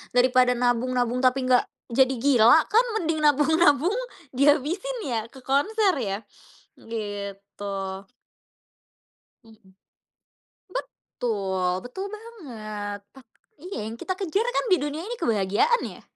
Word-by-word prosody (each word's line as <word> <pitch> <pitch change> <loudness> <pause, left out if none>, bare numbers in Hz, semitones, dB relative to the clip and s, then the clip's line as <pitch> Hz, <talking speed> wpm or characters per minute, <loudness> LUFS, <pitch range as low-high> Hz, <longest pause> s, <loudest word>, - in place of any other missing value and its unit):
daripada 250 0 +4
nabung-nabung 245 0 +1
tapi 255 0 +2
enggak 250 -1 +4 0.3
jadi 260 +2 +3
gila 255 +2 +6
kan 465 +4 +5
mending 325 -5 -1
nabung-nabung 300 +2 +4 0.4
dihabisin 300 - +1
ya 225 -1 -2
ke 260 +2 -15
konser 390 - +2
ya, 200 -4 -2 0.6
gitu. 205 -3 -7 1.8
Hmm. 215 -4 -20 1.0
Betul 190 - -2
betul 380 +11 -6
banget 225 - -7 0.2
tak 265 - -14 0.4
iya, 360 - -5
yang 220 - -5
kita 370 +10 -4
kejar 390 +2 0
kan - - 0
di 370 - +7
dunia 295 +1 -3
ini 485 - -4
kebahagiaan 225 - +2
ya. - - -10
255 Hz, 110 wpm, -25 LUFS, 220-325 Hz, 1.8 s, di